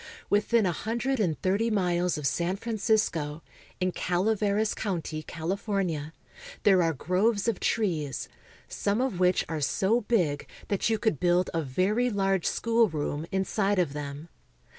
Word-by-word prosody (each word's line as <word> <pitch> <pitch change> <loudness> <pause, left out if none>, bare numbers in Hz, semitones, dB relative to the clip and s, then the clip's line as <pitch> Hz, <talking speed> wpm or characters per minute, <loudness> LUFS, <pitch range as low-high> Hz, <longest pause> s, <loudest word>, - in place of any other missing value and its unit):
Within 210 +2 +3
a 180 - +2
hundred 235 +8 -2
and 175 -7 0
thirty 200 +5 +2
miles 180 -4 +1
of 150 - -5
San 170 +6 0
Francisco, 200 -8 0 0.4
in 185 0 +1
Calaveras 205 +4 +1
county, 165 -6 -3
California, 170 -2 -2 0.5
there 190 -3 +5
are 165 -1 +2
groves 195 - +1
of 230 -5 0
trees 160 - -1 0.4
some 205 +2 -1
of 250 -8 -1
which 180 0 +3
are 160 -2 -3
so 195 - +2
big 180 -11 0 0.2
that 200 +2 +1
you 220 - +2
could 215 - 0
build 175 +1 +2
a 165 - 0
very 190 - +1
large 195 -4 +1
schoolroom 165 -10 0
inside 195 +1 0
of 170 -6 +1
them. 145 +1 -6
190 Hz, 140 wpm, -28 LUFS, 165-215 Hz, 0.5 s, there